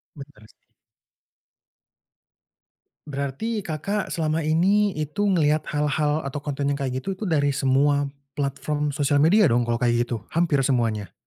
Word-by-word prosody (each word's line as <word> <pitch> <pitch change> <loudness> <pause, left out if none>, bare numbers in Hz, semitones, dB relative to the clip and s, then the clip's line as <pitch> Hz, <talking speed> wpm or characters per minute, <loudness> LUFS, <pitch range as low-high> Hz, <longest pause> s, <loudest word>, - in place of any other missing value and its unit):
Bener 140 -7 -13
sih. - - -28 2.4
Berarti 145 - -3
Kakak 190 +6 -3
selama 160 0 -1
ini 190 +7 +3
itu 155 +7 -3
ngelihat 155 -4 +2
hal-hal 150 0 0
atau 140 +1 -4
konten 145 -1 -3
yang 140 - +1
kayak 130 -2 -3
gitu 195 - -1
tuh 190 0 -5
dari 145 -3 +2
semua 140 +1 +2 0.2
platform 145 +1 -2
sosial 145 0 +1
media 195 +6 +5
dong 120 -4 +3
kalau 120 0 0
kayak 120 -1 +1
gitu? 115 -2 -4
Hampir 165 -3 +2
semuanya? 115 -6 0
145 Hz, 140 wpm, -24 LUFS, 135-160 Hz, 2.4 s, media